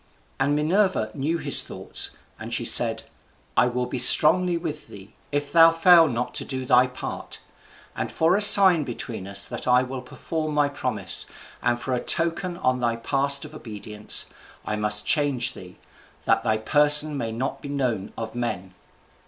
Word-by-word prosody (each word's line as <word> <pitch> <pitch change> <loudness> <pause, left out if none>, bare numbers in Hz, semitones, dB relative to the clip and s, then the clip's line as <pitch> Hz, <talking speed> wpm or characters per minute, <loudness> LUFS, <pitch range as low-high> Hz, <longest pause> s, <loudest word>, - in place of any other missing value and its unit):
And 140 +2 0
Minerva 160 - 0
knew 155 +5 -3
his - - +3
thoughts, - - -3 0.2
and - - -9
she - - -1
said, - - +2 0.5
"I - - +3
will 125 0 -3
be 125 +1 -5
strongly 175 +7 +5
with 155 -3 -7
thee, 100 +1 -14 0.2
if 145 0 -3
thou 165 0 +6
fail 165 0 +5
not 125 -2 -4
to - - -1
do 130 -1 -5
thy 125 0 +3
part. 125 - -8 0.6
And - - -5
for 165 +3 +1
a 205 - 0
sign 195 -5 +6
between 115 -5 -7
us 100 0 +1
that - - -6
I 125 0 +3
will 130 0 -7
perform 155 +4 -6
my 145 -1 +1
promise 145 - -1 0.3
and 120 0 -1
for 130 - -4
a 125 - -1
token 175 +1 0
on 130 -6 -1
thy 120 -1 -1
part 140 +4 0
of 150 - -13
obedience, 105 -5 -4 0.4
I 105 - -3
must 105 0 -1
change 145 -5 +1
thee, 90 -1 -13 0.5
that - - +1
thy 110 - -1
person 150 +5 +3
may 115 -5 -4
not 125 +4 -5
be 145 - -9
known 125 -8 -3
of 110 -1 -7
men." 95 -6 -5
135 Hz, 175 wpm, -23 LUFS, 115-155 Hz, 0.6 s, thou